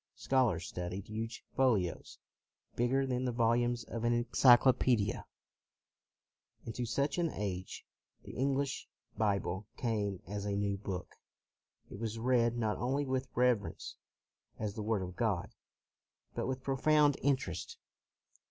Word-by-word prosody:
Scholars 120 -11 +1
studied 90 +2 -5
huge 115 +2 -5
folios, 110 -10 +1 0.6
bigger 130 +3 +2
than 125 -1 -1
the 125 - 0
volumes 120 0 +2
of 115 +1 -5
an 120 0 +3
enclyclo 120 +2 +6
pedia. 110 -6 +1 1.4
Into 120 +1 -3
such 140 +7 0
an 170 -1 +2
age, 95 -3 -4 0.4
the - - -9
English 135 +1 -1 0.3
Bible 100 -2 0
came 105 -5 -1
as 100 +3 -4
a 100 -1 -1
new 100 0 0
book. 95 -2 -6 0.8
It 100 - -8
was 115 0 -3
read 120 0 +2
not 110 -3 0
only 135 +4 0
with 130 0 -1
reverence 120 -4 +1 0.6
as 105 -2 -3
the 110 - -5
Word 105 -2 0
of 90 0 -7
God, 100 -4 -1 0.8
but - - -2
with 130 0 -3
profound 145 +1 +3
interest. 135 -1 -1
115 Hz, 130 wpm, -33 LUFS, 105-130 Hz, 1.4 s, enclyclo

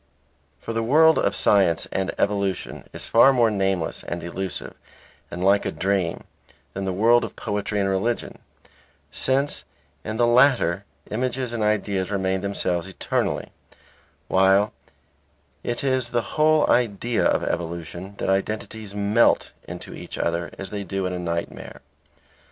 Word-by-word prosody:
For 115 - -5
the 115 - 0
world 155 +7 +5
of - - +1
science 95 -5 +3
and 95 -1 -1
evolution 100 -2 -1
is - - -7
far 120 +4 +6
more 120 -4 +3
nameless 95 -4 -1
and 85 0 -5
elusive 95 +2 -4 0.6
and 90 - -5
like 100 +1 +4
a - - -2
dream 95 -4 -1 0.5
than 95 0 -4
the 95 - -1
world 115 +6 +4
of - - -6
poetry 105 -1 -2
and 100 - +1
religion; 95 +5 -1 0.7
since 135 +2 0 0.4
in 110 +1 -4
the 120 - +4
latter 120 -7 +4 0.3
images 125 +1 -2
and 115 - -2
ideas 100 -3 0
remain 95 -2 0
themselves 90 -3 -1
eternally, 95 - -2 0.8
while 95 +2 +4 0.9
it 120 +2 -2
is 130 -3 +1
the 120 -4 -2
whole 155 0 +4
idea 120 0 +1
of - - +2
evolution 85 +3 -4
that - - -3
identities 105 +1 -2
melt 105 +3 +3 0.2
into - - -8
each - - -8
other 85 0 -1
as 95 - -7
they 100 -1 -4
do 95 -1 -3
in 90 - -2
a 90 - -3
nightmare. 85 -1 -4
100 Hz, 145 wpm, -24 LUFS, 95-115 Hz, 0.9 s, far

